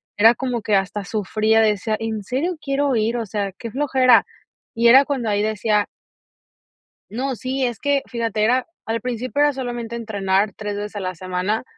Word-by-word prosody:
era 225 +3 +6
como 250 -3 -2
que 210 0 +1
hasta 195 +1 -2
sufría, 215 +2 +1
decía: 215 0 +1
"¿En 220 -2 -3
serio 300 - -2
quiero 275 -1 0
ir?". 225 +2 +1
O 230 - -2
sea, 200 -1 -3
qué 230 +4 -8
flojera, 260 -2 +4 0.5
y 235 -1 +3
era 265 +4 +8
cuando 265 -6 -2
ahí 205 0 +1
decía 210 -1 +1 1.3
no, 260 +4 -2
sí 260 +2 -2
es 240 -2 -3
que 285 -1 +1
fíjate, 230 -3 -2
era 250 +3 +2 0.2
al 225 +1 -2
principio 250 +3 -2
era 295 0 +5
solamente 240 -3 -5
entrenar 200 -2 0
3 205 0 -5
veces 210 +1 -6
a 205 - -3
la 185 0 -3
semana, 185 +4 -2
225 Hz, 180 wpm, -21 LUFS, 210-255 Hz, 1.3 s, era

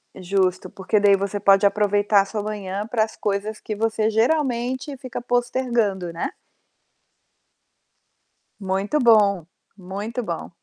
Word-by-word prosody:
Justo, 185 0 -1
porque 195 +2 0
daí 200 -1 +5
você 200 +1 -3
pode 195 0 +4
aproveitar 205 0 +3
sua 210 +1 -4
manhã 205 0 -4
para 225 -2 +1
as 220 - -6
coisas 210 +1 -3
que 215 - -5
você 220 0 0
geralmente 255 +2 0
fica 255 -2 -7
postergando, 240 -6 -1
né. 165 - -3 2.3
Muito 195 +7 -1
bom, 205 - +4 0.3
muito 205 +6 -5
bom. 170 -4 -5
210 Hz, 120 wpm, -22 LUFS, 195-230 Hz, 2.3 s, daí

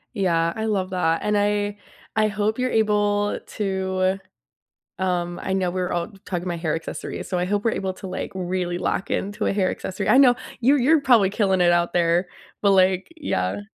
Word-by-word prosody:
Yeah, 170 -5 +1
I 220 - -3
love 195 -4 -1
that 165 -3 +1
and 210 0 +1
I 205 0 0 0.4
I 215 -1 +3
hope 210 +2 -1
you're 255 - +1
able 205 -1 +1
to 190 -1 -1 0.8
um, 175 -1 -1
I 190 - -2
know 185 -2 0
we're 180 -1 -2
all 175 +4 -2 0.2
talking 175 -2 -3
about 170 -2 -3
hair 160 -2 -1
accessories, 165 - -6
so 185 - -1
I 180 - 0
hope 205 +2 -1
we're 230 - +2
able 190 -1 -2
to, 190 - -9
like, 185 +2 -5
really 180 -1 -2
lock 185 - -2
into 205 +2 -2
a - - +1
hair 190 -2 +1
accessory. 190 - -4
I 260 - +6
know, 250 -3 +7 0.2
you're 270 +4 +4
you're 295 +5 +4
probably 240 -8 +4
killing 195 -3 +1
it 175 0 +5
out 175 0 +1
there, 175 +1 +2 0.3
but, 200 - +4
like, 190 -1 +3
yeah 95 - -2
190 Hz, 195 wpm, -23 LUFS, 180-210 Hz, 0.8 s, know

